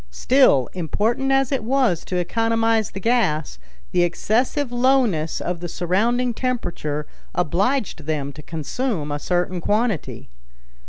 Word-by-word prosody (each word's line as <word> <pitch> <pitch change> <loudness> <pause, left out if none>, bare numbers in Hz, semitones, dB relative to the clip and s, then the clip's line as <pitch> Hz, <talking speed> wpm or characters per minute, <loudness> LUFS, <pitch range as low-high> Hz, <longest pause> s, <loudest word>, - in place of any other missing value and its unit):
Still, 140 - +4
important 215 - 0
as 270 -1 +2
it 270 -5 0
was 245 -8 +1
to 185 - -4
economize 225 +3 +1
the 195 - -7
gas, 185 - 0 0.3
the 180 - +2
excessive 235 - 0
lowness 245 -11 +2
of 175 -1 -3
the 175 - -5
surrounding 230 +9 +1
temperature 175 - -2 0.3
obliged 185 - 0
them 145 -3 -2
to 150 - -10
consume 165 - -3
a 145 - -2
certain 180 +2 -1
quantity. 210 -2 -1
200 Hz, 125 wpm, -22 LUFS, 165-245 Hz, 0.3 s, Still